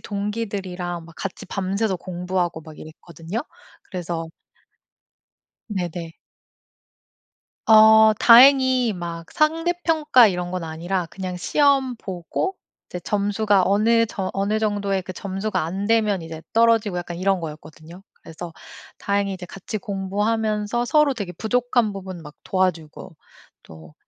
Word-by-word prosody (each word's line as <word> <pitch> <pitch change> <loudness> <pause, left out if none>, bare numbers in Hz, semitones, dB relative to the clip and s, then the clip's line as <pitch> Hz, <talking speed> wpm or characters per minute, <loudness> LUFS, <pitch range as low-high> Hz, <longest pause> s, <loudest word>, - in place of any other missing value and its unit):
동기들이랑 195 -5 -4
막 165 0 -15
같이 195 - -6
밤새서 195 +1 -1
공부하고 180 -1 -3
막 155 -1 -13
이랬거든요. 165 +5 -7 0.5
그래서 170 -2 -4 1.4
네네. 175 -4 -4 1.5
어 220 0 +7
다행히 255 -1 +6
막 170 -2 -7
상대평가 320 -4 +3
이런 180 -2 -2
건 180 -2 -4
아니라 170 +3 -3
그냥 185 +1 -6
시험 270 +5 +2
보고 190 - -4 0.3
이제 180 - -6
점수가 205 +1 +1
어느 230 +3 +3
저 190 -3 -4
어느 200 +2 0
정도의 205 -3 -1
그 185 - -7
점수가 195 +2 -3
안 190 +5 -3
되면 215 -4 +2
이제 160 -1 -8
떨어지고 225 -4 +3
약간 175 0 -6
이런 195 0 +1
거였거든요. 160 +2 -10 0.2
그래서 165 +1 -9 0.5
다행히 200 -1 -1
이제 180 -1 -9
같이 195 +4 -6
공부하면서 210 +3 -1
서로 300 +1 +3
되게 200 -6 -5
부족한 240 +2 0
부분 190 -3 -8
막 150 -1 -12
도와주고 180 -2 -2 0.5
또 80 -1 -14
195 Hz, 280 characters per minute, -22 LUFS, 175-220 Hz, 1.5 s, 어